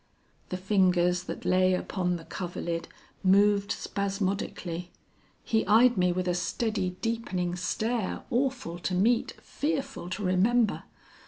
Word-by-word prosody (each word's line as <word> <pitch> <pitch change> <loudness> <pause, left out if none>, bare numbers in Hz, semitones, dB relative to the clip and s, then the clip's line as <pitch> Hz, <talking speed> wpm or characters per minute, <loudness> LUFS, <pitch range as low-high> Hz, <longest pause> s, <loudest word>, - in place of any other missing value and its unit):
"The 185 - -3
fingers 180 -2 +2
that - - -6
lay 185 0 +4
upon 180 -1 -1
the 165 -1 -8
coverlid 170 -2 -4 0.4
moved 200 +1 +4
spasmodically; 195 -3 -3 0.5
he 220 -1 +1
eyed 235 +4 +6
me 180 -2 +3
with 180 +1 -2
a 180 - +2
steady 185 +1 -1
deepening 190 -7 -1
stare, 220 +4 -2
awful 245 -9 -1
to 180 +2 -2
meet, 225 +6 +2
fearful 275 - -3
to 195 +3 -4
remember. 210 +5 +2
185 Hz, 120 wpm, -28 LUFS, 180-220 Hz, 0.5 s, eyed